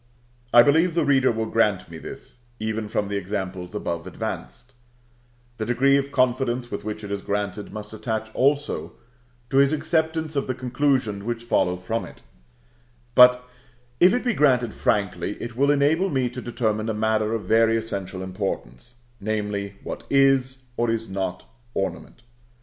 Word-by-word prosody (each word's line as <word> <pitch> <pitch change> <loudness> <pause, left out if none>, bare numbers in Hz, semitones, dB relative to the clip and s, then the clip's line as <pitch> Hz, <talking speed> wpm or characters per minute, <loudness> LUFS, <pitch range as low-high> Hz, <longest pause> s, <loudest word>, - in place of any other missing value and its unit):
I 120 - +9
believe 160 +5 +3
the 165 -3 +2
reader 135 -2 +4
will 110 -1 -2
grant 105 -5 +1
me 80 - -8
this, - - -10 0.2
even 110 0 -2
from 105 0 -1
the 100 0 -2
examples 95 -1 -4
above 85 -5 -3
advanced; 65 - -6 0.8
the 110 - -2
degree 135 +3 +4
of 140 0 0
confidence 125 -1 +1
with - - -4
which 105 0 -5
it 100 - -6
is 100 -1 -2
granted 100 0 -3
must 105 0 -8
attach 110 0 -4
also 145 +2 0 0.6
to 135 - +2
his 140 +1 +5
acceptance 160 0 0
of 140 - 0
the 130 - -1
conclusions 130 -4 0
which 120 +1 -3
will - - -18
follow 90 -5 +2
from 110 +6 -3
it; - - -14 0.9
but 125 0 +7 0.5
if 180 +2 +7
it 250 +2 0
be 245 - +2
granted 125 - +3
frankly, 100 -2 -1
it 120 0 -6
will 140 +3 +2
enable 145 +6 +3
me 130 -5 0
to 125 0 -6
determine 110 -2 -1
a 110 - -1
matter 110 0 +1
of 110 - -3
very 115 0 +3
essential 100 -4 -4
importance, 95 - -5 0.2
namely, 105 -1 -3
what - - -7
is 135 -1 +3
or 120 0 +1
is 115 -1 -1
not 95 -1 -3 0.3
ornament. 95 +4 -4
115 Hz, 165 wpm, -24 LUFS, 105-135 Hz, 0.9 s, I